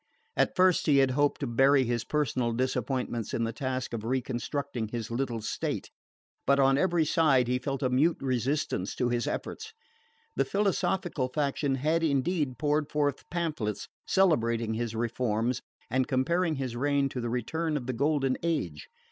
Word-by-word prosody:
At - - +2
first 185 -2 +4
he 145 -2 +5
had 135 -1 +4
hoped 145 +3 +1
to - - 0
bury 135 +3 +4
his 120 -1 -1
personal 130 -6 0
disappointments 130 -2 -1
in 115 - 0
the 115 0 -2
task 130 0 -3
of 110 -2 -3
reconstructing 130 0 -2
his 115 0 -5
little 120 -2 -2
state; 105 - -3 0.6
but 140 +1 +4
on 135 0 +5
every 170 +1 +2
side 145 -6 +3
he 125 +1 +1
felt 135 +2 -3
a 130 - +2
mute 150 +7 +3
resistance 130 -6 -1
to 125 - 0
his 120 -1 0
efforts. 445 0 -5 0.6
The - - +3
philosophical 185 -7 0
faction 140 0 0
had 155 +5 +1
indeed 145 -2 0
poured 150 +2 0
forth 145 -2 -1
pamphlets 150 - -2 0.2
celebrating 115 - +2
his 115 0 -3
reforms, 120 +1 -1 0.3
and 130 +1 0
comparing 160 +5 +1
his 130 -3 -3
reign 140 +2 +1
to 125 - -4
the 120 - -2
return 150 +7 -1
of 130 - -5
the 130 - -2
Golden 135 0 +1
Age. 90 - -2
135 Hz, 165 wpm, -29 LUFS, 120-150 Hz, 0.6 s, he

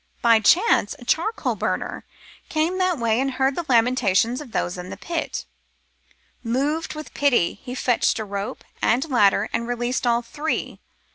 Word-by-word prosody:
By 230 -2 +6
chance 310 - +3
a 245 - -13
charcoal 390 - 0
burner - - -3 0.4
came 325 +4 0
that 365 -2 +1
way 230 -1 +1
and 270 0 0
heard 265 +1 +1
the 345 - -3
lamentations 240 0 +2
of 275 -6 -11
those 175 - -1
in 180 0 -7
the - - -7
pit: 335 -1 -4 1.0
Moved 285 +8 -1
with 305 0 -8
pity, 245 -10 +2
he 250 -1 -6
fetched 245 -2 +1
a 220 - -3
rope 200 0 -5 0.2
and 255 +7 +2
ladder 205 -3 +4
and 235 - -1
released 245 +1 -1
all 235 0 +2
three. 295 +7 -3
245 Hz, 160 wpm, -23 LUFS, 230-300 Hz, 1.0 s, By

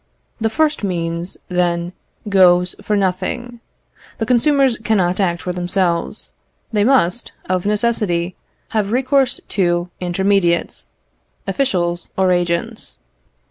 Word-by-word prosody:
The 225 - +1
first 300 +2 +1
means, 170 -2 -2
then, 175 -1 0 0.3
goes 180 -2 +5
for 210 0 0
nothing. 200 +6 -2 0.6
The 225 - -1
consumers 260 +1 +3
cannot 195 -5 +1
act 175 -3 0
for 180 - -2
themselves. 175 -1 -1 0.4
They 205 -1 +3
must, 240 -4 +2
of 185 +1 0
necessity, 205 -5 0 0.3
have 210 -2 -1
recourse 260 +1 +2
to 175 -2 0
intermediates, 180 -1 +1 0.6
officials 175 -10 -1
or 190 -1 +3
agents. 175 +6 -1
190 Hz, 105 wpm, -19 LUFS, 175-225 Hz, 0.6 s, goes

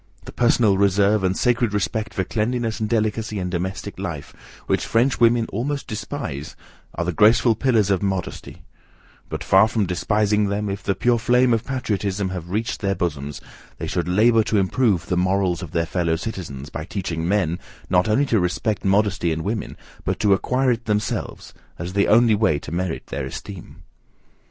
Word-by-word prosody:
The - - -8
personal 115 -5 +3
reserve, 100 +1 +3
and 95 0 +1
sacred 120 -3 +1
respect 110 +2 -2
for 95 - 0
cleanliness 115 +3 -1
and 110 -1 -2
delicacy 110 -1 -1
in 90 -2 -3
domestic 95 +2 -4
life, - - -5 0.3
which - - 0
French 120 +4 +2
women 115 0 +4
almost 140 +7 -2
despise, 105 - -5 0.4
are 85 - -2
the 90 - -1
graceful 110 +5 +5
pillars 110 -4 +2
of 95 - +1
modesty; 95 -2 -4 0.7
but, - - -4
far 95 +3 +5
from 110 -2 0
despising 105 +3 +1
them, 100 +1 -2
if 100 - -5
the 95 - -1
pure 120 +4 +2
flame 125 +1 +3
of 115 - 0
patriotism 105 -7 -2
have 90 -2 -6
reached 110 +4 -2
their 100 -1 0
bosoms, 75 -6 -3 0.4
they - - -5
should 90 -2 -2
labour 110 +5 +4
to 110 - +1
improve 100 -2 +1
the 90 - -1
morals 90 -1 +1
of 90 - -6
their 85 +2 0
fellow 85 -1 0
citizens, 80 -8 -6
by 80 - -5
teaching 85 -3 -3
men, 90 -4 +1 0.3
not 90 +3 +2
only 130 +7 +3
to 115 -6 +2
respect 90 +4 -1
modesty 95 -3 +2
in 80 0 -2
women, 105 +2 -3 0.3
but - - -2
to 105 -2 +4
acquire 125 +6 +1
it 115 0 -2
themselves, 105 -1 -2 0.2
as 90 +1 -5
the 100 0 +2
only 115 +1 +5
way 105 -8 +2
to 70 - -8
merit 90 -1 -3
their 65 - -4
esteem. 90 +6 -9
100 Hz, 180 wpm, -22 LUFS, 90-115 Hz, 0.7 s, graceful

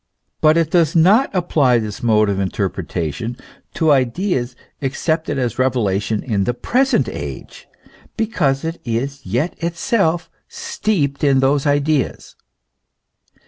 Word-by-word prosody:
But 155 +1 +5
it 165 -2 +1
does 165 -3 +2
not 200 +11 +5
apply 155 -9 +2
this 110 -3 -4
mode 110 -2 +3
of 100 -1 -1
interpretation 95 - -3 0.4
to 160 -2 +3
ideas 130 - 0 0.3
ac 135 -1 -2
cepted 160 -3 -1
as 125 -2 -2
revelation 105 -5 0
in 100 -5 0
the 120 - -1
present 265 - +1
age, - - -7 0.5
because 150 -12 0
it 165 +1 -4
is 135 +4 -3
yet 125 - -1
itself 170 0 0 0.2
steeped 145 -11 -2
in 135 -2 +4
those 135 +2 +2
ideas. 145 -1 0
140 Hz, 125 wpm, -19 LUFS, 120-165 Hz, 0.5 s, But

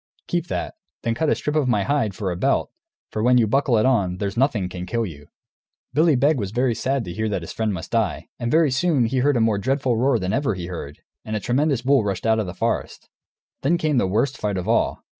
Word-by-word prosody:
Keep 175 -1 -2
that; - - -3 0.3
then 115 - 0
cut 155 +6 0
a - - +3
strip 150 - -3
of 150 -4 +2
my 105 -5 +2
hide, 135 -8 0
for 95 -2 -2
a - - -3
belt, 135 +10 0 0.4
for 110 - -2
when 125 +2 +4
you 120 - +4
buckle 125 +1 +2
it 110 - +3
on, 100 -9 +2
there's 100 0 -3
nothing 120 -7 +1
can 90 0 -7
kill 115 +3 -1
you." 75 -6 -10 0.7
Billy 155 0 +4
Beg 140 +3 +3
was 100 -3 -2
very 120 +3 +1
sad 130 +1 -1
to 85 - -6
hear 110 +4 -2
that 95 -4 -2
his - - -7
friend 110 -1 -1
must 85 -4 -6
die. - - 0
And 120 - -2
very 155 0 +3
soon 140 -2 +2
he 130 +3 0
heard 140 0 +2
a - - +2
more 110 -3 +2
dreadful 130 +1 0
roar 130 +1 +3
than 95 -3 -2
ever 135 -7 0
he 90 -2 -5
heard, 80 -5 -7 0.2
and 110 - -4
a - - 0
tremendous 130 +3 0
bull 135 -2 +3
rushed 100 -1 -3
out 110 0 +3
of 105 - -2
the 90 - -6
forest. 115 +3 -3 0.5
Then 165 +6 +2
came 155 -5 +1
the 95 - +1
worst 120 +8 0
fight 105 -2 -1
of 90 +2 -4
all. 115 - +1
115 Hz, 255 wpm, -23 LUFS, 100-135 Hz, 0.7 s, when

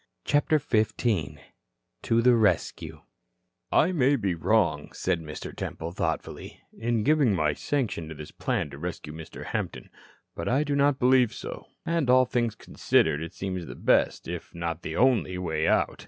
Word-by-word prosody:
CHAPTER 145 +2 +3
XV 110 -7 0 1.0
TO 115 0 +2
THE 125 0 +6
RESCUE 105 -7 0 0.7
"I - - +4
may 145 -5 +3
be 100 -8 0
wrong," 85 -4 +1
said 90 -3 -1
Mr. 75 -1 -8
Temple, 80 +1 -5
thoughtfully, 85 -2 -4 0.2
"in 115 -1 -1
giving 140 -7 +3
my 75 -3 +1
sanction 115 - -2
to 80 - -7
this 75 0 -9
plan 75 - -2
to 70 - -9
rescue 85 -2 -6
Mr. 80 0 -9
Hampton. - - -4 0.4
But - - -4
I 135 +4 +2
do 145 -1 -1
not 140 -1 +3
believe 125 -2 +4
so. - - -7 0.2
And, 165 -6 0
all 130 0 +6
things 120 -3 -1
considered, 75 - +1
it 85 +3 -7
seems 95 -3 -4
the - - -8
best - - +2
if - - -7
not 85 -1 -3
the - - -5
only 120 -8 +2
way 80 -3 -1
out. - - +1
105 Hz, 165 wpm, -27 LUFS, 85-130 Hz, 1.0 s, THE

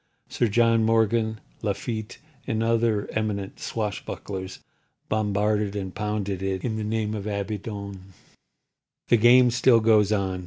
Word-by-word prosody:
Sir 120 - +1
John 115 +1 +3
Morgan, 110 0 +2 0.2
Lafitte 110 +2 -3 0.3
and 115 -3 0
other 115 -2 +1
eminent 105 -3 -3
swash 105 -3 -3
bucklers 95 -1 -6 0.5
bombarded 105 -1 0
and 95 -3 -4
pounded 105 -2 -3
it 95 -1 -2
in 110 -3 -2
the 110 - -3
name 110 0 -1
of 105 -1 -4
Abaddon. 100 -2 -5 1.0
The 120 - +6
game 120 +2 +6
still 120 0 +5
goes 110 -2 +4
on. 95 -3 0
105 Hz, 130 wpm, -25 LUFS, 100-115 Hz, 1.0 s, The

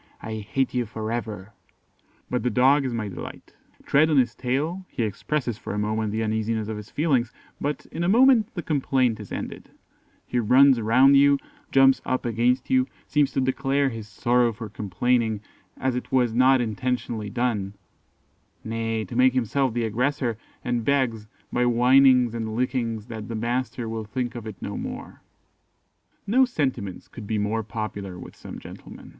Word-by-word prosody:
I 110 0 -5
hate 115 +5 -1
you 125 -2 -1
for 110 0 -5
ever.' 110 -3 -5 0.7
But 125 - -1
the 125 - 0
Dog 135 +5 +4
is 130 - -1
my 110 -2 -2
delight. 95 - -9 0.3
Tread 155 +3 +4
on 150 - +3
his 125 -2 +3
tail, 150 +9 -2
he 120 - -2
expresses 120 +3 -2
for - - -5
a - - -3
moment 105 0 -1
the 110 +1 -1
uneasiness 110 0 -1
of 110 - -3
his 105 -1 -9
feelings, 135 -6 +1 0.3
but 145 0 -2
in 165 - -3
a 175 - +1
moment 235 0 +5
the 175 - -4
complaint 130 -6 +1
is 105 - -10
ended: - - -6 0.6
he 125 - -1
runs 130 +2 +5
round 130 +6 +5
you, 140 0 +5 0.3
jumps 135 0 +5
up 130 -1 -2
against 120 +2 +1
you, 130 0 +3 0.2
seems 145 -1 +2
to 135 - +1
declare 135 +1 +1
his 115 -3 -7
sorrow 120 +3 +2
for 110 0 -8
complaining, 110 +3 0 0.4
as 130 -1 -1
it 125 - -5
was 125 -3 +2
not 130 +2 +5
intentionally 120 -2 -2
done, 105 -4 -1 0.9
nay, 115 -1 -2
to 120 - -8
make 130 +1 +5
himself 130 +2 +1
the 115 0 -1
aggressor, 120 +2 0 0.3
and 120 -1 0
begs, 120 -5 0 0.3
by 125 - +1
whinings 125 0 +5
and 110 -2 -4
lickings, 115 -3 -1
that 110 -2 -7
the 115 - -5
master 120 +1 -2
will 110 -1 -4
think 120 +3 -3
of 115 -2 -7
it 110 - -6
no - - -4
more." - - -7 1.0
No 250 +6 +4
sentiments 130 - -2
could 110 -5 -10
be 110 - -1
more 105 +2 0
popular 105 -4 -5
with - - -11
some - - -9
gentlemen. - - -11
120 Hz, 175 wpm, -25 LUFS, 110-130 Hz, 1.0 s, moment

